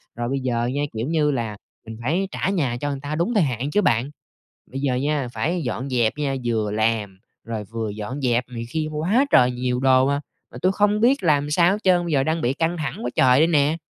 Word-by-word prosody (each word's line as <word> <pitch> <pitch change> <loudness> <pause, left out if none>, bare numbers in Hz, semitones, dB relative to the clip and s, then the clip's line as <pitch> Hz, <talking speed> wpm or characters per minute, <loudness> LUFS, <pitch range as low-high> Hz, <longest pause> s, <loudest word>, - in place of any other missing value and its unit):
Rồi 120 0 -3
bây 135 +1 -1
giờ 120 -2 -1
nha, 145 +1 -1
kiểu 115 +4 -3
như 155 -2 +2
là, 115 -6 -3 0.3
mình 110 0 -8
phải 170 +10 0
trả - - -1
nhà 145 -11 0
cho 145 - -1
người 140 - -3
ta 145 +1 -4
đúng 170 +9 0
thời 205 -6 +3
hạn 130 +1 -2
chứ 210 - +3
bạn. 125 - +1 0.6
Bây 135 - -6
giờ 135 -2 0
nha, 140 0 -1
phải 170 +5 -1
dọn 125 0 -3
dẹp 120 -3 +2
nha, 140 -2 -1
vừa 110 -3 0
làm, 105 -2 -1 0.3
rồi 110 -2 -5
vừa 110 +1 -4
dọn 110 +7 -6
dẹp 125 -1 +1
này 115 -2 -6
kia 155 +3 -2
quá 180 - +2
trời 125 0 +5
nhiều 125 0 -2
đồ 130 0 +4
hà, 140 0 0 0.3
mà - - -9
tui 185 - +3
không 205 +1 +2
biết 255 +5 +3
làm 150 -4 +2
sao 170 +4 +4
hết 205 - -1
trơn, 180 -2 +4
bây 170 - -3
giờ 135 -2 +3
đang 160 +2 0
bị 125 -3 +1
căng 165 +3 -1
thẳng 155 -3 -4
quá 125 - -1
trời 130 +1 +5
đây 160 - +5
nè! 150 -1 +2
135 Hz, 245 wpm, -22 LUFS, 120-160 Hz, 0.6 s, trời